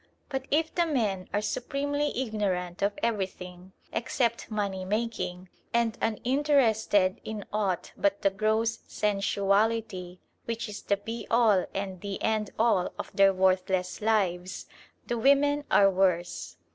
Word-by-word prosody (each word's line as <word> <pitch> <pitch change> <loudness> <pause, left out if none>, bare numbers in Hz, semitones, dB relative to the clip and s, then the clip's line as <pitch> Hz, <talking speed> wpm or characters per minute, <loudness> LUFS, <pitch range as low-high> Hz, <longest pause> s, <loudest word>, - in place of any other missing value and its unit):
But 265 -2 -3
if 315 +2 +1
the 345 -1 +2
men 210 - -1
are 205 +1 0
supremely 285 +5 -1
ignorant 195 -7 -2
of 200 +1 0
everything 185 -4 -3 0.2
except 235 0 -1
money 200 -3 -2
making, 185 -3 -3 0.3
and 235 -2 +2
uninterested 225 -5 +2
in 215 -2 -5
aught 200 -4 -1
but 200 0 0
the 195 - +4
gross 220 +3 0
sensuality 200 -1 0 0.3
which 230 0 -3
is 210 -1 -7
the 200 - +1
be 225 +2 -6
all 225 -5 +4
and 190 -2 -4
the 200 -1 -4
end 215 -2 +1
all 220 -5 +2
of - - -6
their 195 0 +6
worthless 185 0 +1
lives, 190 -4 0 0.4
the 235 - -2
women 285 +3 +3
are 195 -1 +6
worse. 180 -2 0
210 Hz, 135 wpm, -28 LUFS, 190-230 Hz, 0.4 s, their